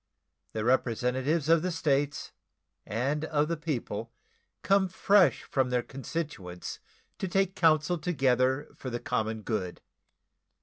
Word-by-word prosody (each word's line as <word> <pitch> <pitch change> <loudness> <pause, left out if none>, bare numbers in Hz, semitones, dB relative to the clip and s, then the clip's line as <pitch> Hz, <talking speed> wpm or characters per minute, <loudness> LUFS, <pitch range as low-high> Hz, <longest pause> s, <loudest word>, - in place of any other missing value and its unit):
The 110 - -2
representatives 130 +5 +1
of 165 0 +5
the 185 - -1
States 145 -4 0 0.6
and 135 +7 -1
of 150 0 +1
the 170 - 0
people 120 -8 -4 0.5
come 195 -1 +4
fresh 190 +1 +3
from 130 -2 0
their 125 -1 +1
constituents 130 - -5 0.4
to 190 - -2
take 195 +1 +1
counsel 160 +1 +3
together 130 -4 +1
for 130 - -6
the 120 -1 -3
common 110 -1 -2
good. 95 -6 -3
140 Hz, 125 wpm, -29 LUFS, 120-165 Hz, 0.6 s, of